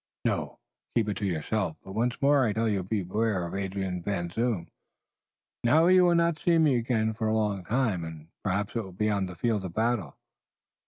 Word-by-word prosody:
"No. - - -1 0.4
Keep 110 -3 +2
it 100 - -2
to 100 - -1
yourself, 90 +1 -1
but 95 - -10
once 120 +3 0
more 140 -1 +5
I 110 -4 +1
tell 115 +1 0
you 100 -3 +1
beware 100 0 -1
of 85 - -7
Adrian 95 -2 -3
Van 85 -2 -2
Zoon. 110 -6 -1 1.0
Now 155 +8 +5
you 185 0 +6
will 175 -1 +4
not 170 -1 +2
see 170 -1 +3
me 155 -5 +4
again 115 -2 0
for 110 0 -2
a 110 - +1
long 105 -3 0
time, 110 -7 0
and 80 -1 -8 0.2
perhaps 100 +2 -1
it 115 - +1
will 95 -2 -10
be 105 +3 0
on 100 -2 0
the 90 - -8
field 105 +2 0
of 90 -2 -6
battle. 110 - 0
105 Hz, 205 wpm, -28 LUFS, 95-120 Hz, 1.0 s, you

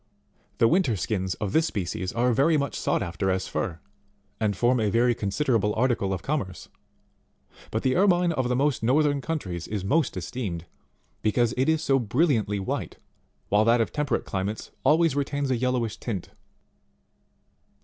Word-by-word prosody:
The 115 - +5
winter 165 - +2
skins 95 -2 -2
of 105 -4 -4
this 160 0 +3
species 90 - -3
are 120 +1 +1
very 150 +6 +3
much 140 -2 -1
sought - - 0
as 95 +2 -1
fur, 85 -6 -3 0.6
and 105 -3 0
form 120 +3 +3
a 110 -2 +1
very 120 +3 +3
considerable 105 0 0
article 115 -5 +1
of 95 - -3
commerce; 120 - -3 1.0
but 110 - -2
the 130 -1 +2
Ermine 180 -2 +3
of 130 -6 -1
the 125 - +1
most 140 -1 +1
northern 145 +4 +2
countries 95 - -4
is 100 -3 -4
most 155 +9 +1
esteemed, 95 -10 -4 0.6
because 110 +1 +2
it 130 +4 +1
is 160 -1 +1
so 135 -1 +3
brilliantly 115 -4 +1
white, 95 - -4 0.5
while 105 +1 +4
that 115 +2 +4
of 115 - 0
temperate 150 -2 -1
climates 100 +3 -4
always 160 -2 +4
retains 140 -1 -1
a - - +3
yellowish 120 -3 -1
tint 100 -7 -4
23. - - -30
120 Hz, 160 wpm, -26 LUFS, 100-140 Hz, 1.0 s, The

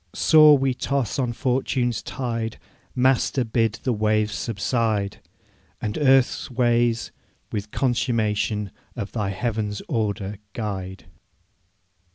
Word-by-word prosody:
Sore 155 -2 +7
we 135 -1 +1
toss 135 -1 -1
on 125 -3 0
fortune's 125 -1 0
tide; 115 -4 -3 0.4
Master, 130 +1 +2
bid 115 -1 +1
the 125 - +1
waves 105 0 +1
subside! 110 -1 -1 0.6
And 105 -1 -3
earth's 135 -3 +3
ways 120 -2 +1 0.4
with 105 0 -4
consummation 110 -5 0 0.2
Of 105 -5 -5
Thy 105 -4 -2
heaven's 105 0 -2
order 105 - -2
guide!' 95 -5 -5
115 Hz, 105 wpm, -24 LUFS, 105-125 Hz, 0.6 s, Sore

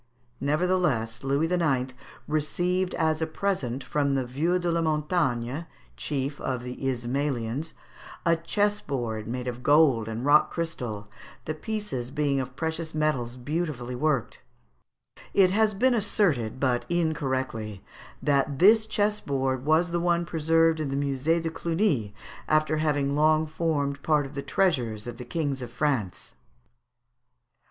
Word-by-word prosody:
Nevertheless 145 -7 0
Louis 140 +4 +1
IX. 135 -8 +1 0.3
received 175 +5 0
as 160 0 +1
a 160 - +1
present 155 -8 -2
from 140 +2 0
the 130 -2 0
Vieux 155 +9 0
de 175 -1 -1
la 170 0 +1
Montagne, 150 -3 0 0.3
chief 140 - -3
of 125 -2 -2
the 125 0 -6
Ismalians, 130 +2 -2 0.5
a 170 -1 +5
chessboard 145 - -1
made 125 +1 -4
of 125 0 -4
gold 140 -6 +4
and 115 +3 -4
rock 145 +1 +5
crystal, 120 -11 -4 0.4
the 155 - -2
pieces 205 - -4
being 140 0 0
of 130 -1 -5
precious 160 +1 -3
metals 130 -6 0
beautifully 135 -2 -3
worked. 135 -1 0 1.0
It 190 -2 +6
has 215 +1 +2
been 255 +5 +3
asserted, 170 - +1
but 125 -3 +1
incorrectly, 130 - -1 0.4
that 140 -1 +2
this 215 +5 +6
chessboard 140 - 0
was 165 +3 +3
the 175 - 0
one 170 0 +1
preserved 165 0 +2
in 150 -3 -2
the 135 - -2
Musée 140 +4 +1
de 165 -1 -3
Cluny, 160 - 0 0.3
after 155 0 +2
having 145 -3 +1
long 155 +1 +4
formed 150 -3 -1
part 150 -2 +2
of 135 - -9
the 140 - -3
treasures 130 - 0
of 120 -1 -6
the 125 - -8
Kings 140 0 -2
of 125 - -5
France. 120 - -1
150 Hz, 140 wpm, -27 LUFS, 125-165 Hz, 1.0 s, It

